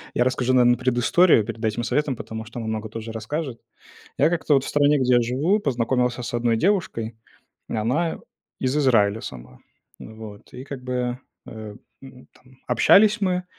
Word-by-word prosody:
Я 120 - +3
расскажу, 130 0 0
наверно, 120 -1 +4
предысторию 130 +3 +3
перед 115 +1 -7
этим 110 +2 -1
советом, 145 +1 0
потому 110 0 -7
что 120 +2 -8
она 115 - -5
много 110 0 -3
тоже 115 +1 -7
расскажет. 120 +3 -5 0.6
Я 150 +4 +3
как-то, 160 -3 +1
вот, 135 - +2
в - - -5
стране, 145 0 +3
где 125 -1 +2
я - - +4
живу, 145 - +1
познакомился 125 - 0
с - - -5
одной 120 -1 +1
девушкой. 120 - -1 0.5
Она 125 +10 -1 0.4
из 130 +2 -1
Израиля 115 -7 +3
сама. 65 - -10 0.4
Вот, 110 -2 -11
и 130 - -8
как 135 -2 -8
бы, 125 -1 -2 0.3
э, 110 -1 -9 0.3
м, 130 -1 -14
там, 130 0 -23
общались 215 +2 +5
мы, 180 -2 0
125 Hz, 170 wpm, -23 LUFS, 115-145 Hz, 0.6 s, общались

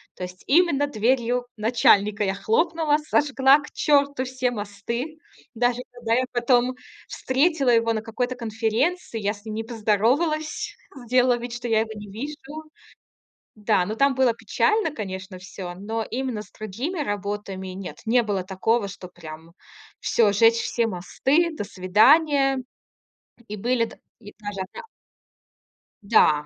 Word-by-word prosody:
То - - -7
есть 180 +1 -8
именно 290 -2 +3
дверью 245 0 +1
начальника 210 -2 +3
я 195 - 0
хлопнула, 315 - +1
сожгла 285 -2 +4
к 295 - -11
черту 285 -2 +2
все 255 0 -1
мосты. 235 +8 -5 0.4
Даже 245 +1 +1
когда 235 -2 -1
я 255 - +2
потом 245 +1 +2 0.3
встретила 275 +1 +1
его 230 -1 +3
на 220 - -2
какой-то 245 +2 -3
конференции, 230 +6 -1
я 205 -1 0
с 205 +2 -18
ним 215 - -5
не 225 - -3
поздоровалась, 290 - 0 0.3
сделала 250 0 +3
вид, 240 0 -6
что 240 0 -5
я 220 -1 +3
его 220 - -4
не 205 -1 -9
вижу. 290 +6 -7 0.9
Да, 210 -3 +1
но 215 - -4
там 275 +2 +3
было 260 -2 +3
печально, 320 - +1
конечно, 190 -5 -6
всё. 185 -1 -8
Но 220 +4 -4
именно 250 -4 -3
с - - -18
другими 240 - -4
работами- 205 -5 -4
нет, 185 0 -7
не 240 +2 +4
было 200 -4 -2
такого, 200 +3 0
чтоб 185 -2 -10
прям 160 -1 -11 0.5
всё, 215 -3 +3
жечь 225 +3 +5
все 235 -1 0
мосты, 265 - 0
до 245 - -4
свидания. 270 - +4 0.9
И 210 - -5
были 235 +3 +1
д - - -13 0.2
и 205 -2 -12
даже 205 -2 -6
одна 190 - -9 1.2
Да. 155 -8 +4
230 Hz, 145 wpm, -24 LUFS, 205-270 Hz, 1.2 s, жечь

